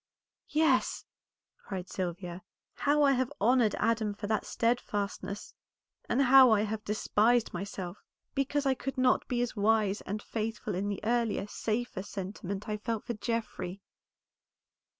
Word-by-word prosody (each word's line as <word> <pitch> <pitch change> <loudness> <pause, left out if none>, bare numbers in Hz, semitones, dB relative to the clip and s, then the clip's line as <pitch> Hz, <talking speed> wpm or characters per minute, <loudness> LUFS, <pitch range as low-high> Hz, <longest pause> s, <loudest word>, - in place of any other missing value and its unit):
"Yes!" 300 -4 +2 0.6
cried 185 -2 -5
Sylvia, 180 -1 -4 0.3
"how 295 +1 +2
I 280 - +6
have 260 0 +1
honored 235 0 +4
Adam 220 -3 +1
for 205 - -6
that 215 0 -1
steadfastness, 205 -3 -2 0.6
and 270 +3 +3
how 260 0 +8
I 215 -2 +4
have 215 0 -3
despised 220 +2 +2
myself, 185 0 -5 0.3
because 280 +1 0
I 270 - +4
could 270 +1 -5
not 255 0 +3
be 245 -1 0
as 245 - -4
wise 210 -1 +2
and 205 +2 -4
faithful 220 -1 -3
in 195 +3 -1
the 200 - -3
earlier, 230 -3 +1
safer 220 0 -2
sentiment 195 0 -5
I 210 -1 -1
felt 225 0 -3
for 240 - -3
Geoffrey." 210 -4 -3
220 Hz, 140 wpm, -30 LUFS, 200-245 Hz, 0.6 s, how